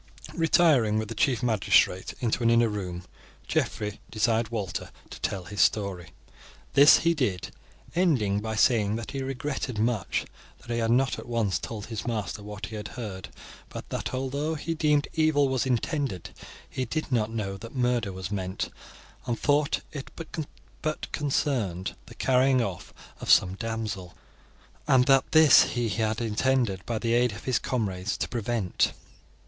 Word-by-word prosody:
Retiring 155 -10 +4
with 110 -1 -2
the - - -4
chief 120 +2 +1
magistrate 105 -5 +2
into 120 0 0
an 115 - +3
inner 115 0 +4
room, 90 -4 -4 0.4
Geoffrey 105 0 -1
desired 110 +1 +1
Walter 100 -7 -4 0.2
to - - -9
tell 95 -2 -2
his 90 +1 -2
story. 100 -3 +1 0.6
This 145 +2 +8
he 170 - +5
did, 105 - -1 0.4
ending 130 - +2
by 110 +1 -3
saying 105 -2 +3
that 115 0 -5
he 135 - -3
regretted 135 -2 -3
much 110 -4 0 0.3
that 120 - -10
he 115 - 0
had 115 -1 0
not 130 +3 +2
at - - -9
once 110 -8 0
told 105 -3 -6
his 110 0 -5
master 110 -2 -3
what 105 0 -7
he 110 - -8
had 105 -1 -5
heard; 105 -7 -7 0.4
but - - -8
that, - - -3
although 140 +5 -2
he 160 +2 -3
deemed 150 -2 +2
evil 155 -3 +3
was 130 -1 0
intended, 130 - -1 0.4
he 130 - -3
did 155 +5 -3
not 110 -3 +1
know 105 -4 -3
that 115 +5 -10
murder 125 -4 +1
was 95 0 -6
meant, 95 -2 -3 0.6
and 120 -2 -1
thought 145 0 +2
it 140 -3 -7 0.7
but 155 0 -3
concerned 120 - -1
the - - -12
carrying 130 0 +3
off 100 -7 -3 0.3
of - - -6
some 90 - +6
damsel, 110 -4 -4 0.7
and 130 -2 +5
that 135 -1 +4
this 155 -3 +7
he 120 -2 0
had 110 +2 0
intended, 115 -3 +1
by 115 - -1
the 115 +1 0
aid 120 -1 +3
of 105 - -9
his 130 - +1
comrades, 100 -5 -2
to - - -2
prevent. 115 -4 0
115 Hz, 165 wpm, -27 LUFS, 105-130 Hz, 0.7 s, This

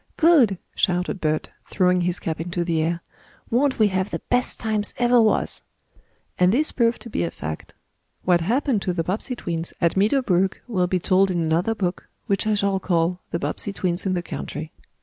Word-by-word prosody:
"Good!" 295 - +5 0.2
shouted 180 0 0
Bert, 155 -1 -1 0.2
throwing 180 -1 +2
his 175 0 0
cap 160 -1 -3
into 175 +1 -2
the 165 -2 0
air. 170 +2 -1 0.5
"Won't 260 +3 +2
we 215 -2 +4
have 185 0 -1
the - - -2
best 250 0 +2
times 215 -2 -1
ever 240 0 +4
was!" 220 - +1 0.8
And 180 0 +5
this 295 +8 +2
proved 235 -1 +1
to 235 - -9
be - - -1
a 85 - -1
fact. 80 -1 -7 0.5
What 175 -2 +3
happened 240 - +1
to 180 - -1
the 170 -1 -1
Bobbsey 210 +8 -2
twins 170 -6 -3
at 170 -1 +2
Meadow 215 +8 +2
Brook 190 -2 +1
will 185 -7 +1
be 185 - +1
told 190 +2 +3
in 180 -2 0
another 170 +7 +1
book, 180 -4 -3 0.2
which 200 +2 0
I 215 - +2
shall 200 -1 +1
call, 175 -1 0
"The - - -1
Bobbsey 200 +3 -3
Twins 180 -1 -1
in 185 - +1
the 175 - -2
Country." 155 -1 -6
185 Hz, 195 wpm, -23 LUFS, 175-220 Hz, 0.8 s, Good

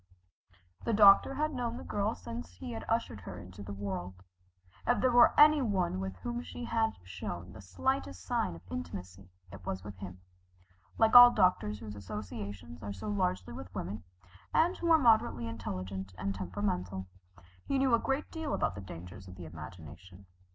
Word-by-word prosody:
The 230 - 0
doctor 205 +5 +7
had 305 +2 0
known 240 -2 -2
the - - -8
girl 205 +2 -1
since 235 +1 -8
he 255 -3 -7
ushered 225 - -2
her 90 0 -8
into 90 +3 -10
the 100 0 -7
world. 95 -2 -5 0.6
If - - +3
there 255 - +3
were 240 0 +6
any 300 0 +8
one 190 - 0
with 95 0 -4
whom 240 - -4
she 245 - -8
had 225 -1 0
shown 90 -1 -6
the 105 - -10
slightest 90 0 -2
sign 90 - 0
of 85 - -13
intimacy, 90 +2 -7 0.2
it 95 -2 -11
was 95 +1 -4
with 105 -2 -9
him. 90 -1 -8 0.8
Like 225 +1 +4
all 245 0 +13
doctors 145 - +2
whose 105 -1 -8
associations 100 -4 -7
are 100 0 -5
so 210 - -6
largely 180 - -1
with 90 +2 -8
women, 100 +1 -4 0.5
and 345 +3 +4
who 340 - -2
are 325 - +8
moderately 230 - +3
intelligent 95 -4 -5
and 100 +2 -2
temperamental, 95 0 -3 0.6
he 275 - +1
knew 265 -2 +3
a 235 - +6
great 270 +4 -2
deal 320 -3 -2
about - - 0
the 95 - -7
dangers 90 0 -10
of 90 - -10
the 90 -2 -9
imagination. 85 +4 -11
100 Hz, 175 wpm, -32 LUFS, -, 0.8 s, all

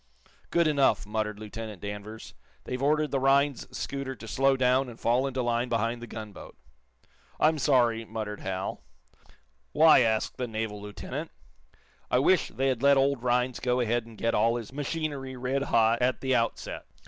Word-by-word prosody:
"Good 170 0 +2
enough," 140 -7 +2
muttered 105 0 -2
Lieutenant 110 -1 -7
Danvers. 105 +2 -7 0.3
"They've 125 +1 -5
ordered 150 +2 +2
the 135 - +1
Rhinds 140 0 +2
scooter 135 -1 -5
to 115 - -11
slow 135 +6 +2
clown 130 +1 +2
and 120 - -12
fall 125 +4 +2
into 130 -1 -2
line 120 +1 0
behind 115 +1 -1
the 120 - -7
gunboat." 105 - -9 0.8
"I'm 155 0 +3
sorry," 120 -5 +3
muttered 110 -2 -5
Hal. 95 0 -4 0.9
"Why?" 155 +1 +7
asked 110 -3 +1
the 125 - -2
naval 110 -2 -4
lieutenant. 105 0 -6 0.8
"I - - +3
wish 165 +7 +3
they 135 +1 -1
had 125 -3 -1
let 140 0 +5
old 135 -2 +2
Rhinds 125 0 0
go 125 0 0
ahead 120 -1 0
and 115 -2 -13
get 115 - 0
all 115 +1 +3
his 120 0 -6
machinery 145 -2 -3
red 130 +2 -1
hot 115 +1 +3
at 125 +1 +1
the 130 -1 0
outset." 115 -2 -2
125 Hz, 170 wpm, -28 LUFS, 110-135 Hz, 0.9 s, Why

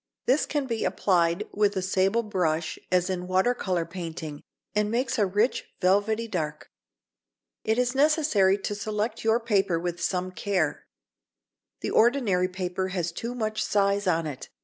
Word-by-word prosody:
This 265 +5 +2
can 290 -2 -1
be 230 -3 -2
applied 175 +1 +1
with 205 0 +1
a - - +1
sable 195 +4 +2
brush 170 -6 -1
as 180 -1 +3
in 180 -1 -3
water 190 +6 +3
colour 180 -8 -1
painting, 165 -4 -6 0.3
and 210 0 +1
makes 235 +1 0
a 205 - +3
rich 210 +7 0
velvety 205 +5 +2
dark. 155 -7 -4 0.9
It 220 +1 +1
is 250 0 +1
necessary 280 -10 +3
to 205 - -3
select 210 +2 -3
your 225 +1 +3
paper 200 -7 +1
with 175 0 -4
some 185 0 -1
care. 180 -3 -1 0.9
The - - -2
ordinary 220 -7 +3
paper 185 0 -3
has 175 -3 -2
too 235 +8 -5
much 215 -2 -1
size 200 0 +1
on 165 -2 +2
it. 145 -4 -6
195 Hz, 155 wpm, -26 LUFS, 180-220 Hz, 0.9 s, as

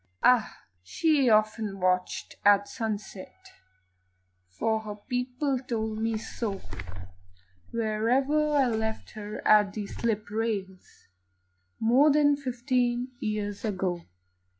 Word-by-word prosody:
Ah! 245 -3 +3 0.2
she 280 - +2
often 215 -2 +2
watched 180 0 0
at 205 0 +5
sunset 205 - -6 1.0
For 220 - 0
her 215 -1 -7
people 250 +4 -2
told 220 -4 -3
me 225 0 0
so 215 -2 -4 1.1
Where 220 -1 -1
I 290 +2 +3
left 220 -2 -2
her 210 -1 -7
at 210 -2 +5
the 210 -2 -4
slip 215 -1 -3
rails 205 -4 -4 0.7
More 255 +7 +5
than 290 0 +4
fifteen 250 -2 -1
years 210 -1 -3
ago. 185 -5 -1
220 Hz, 105 wpm, -28 LUFS, 205-250 Hz, 1.1 s, at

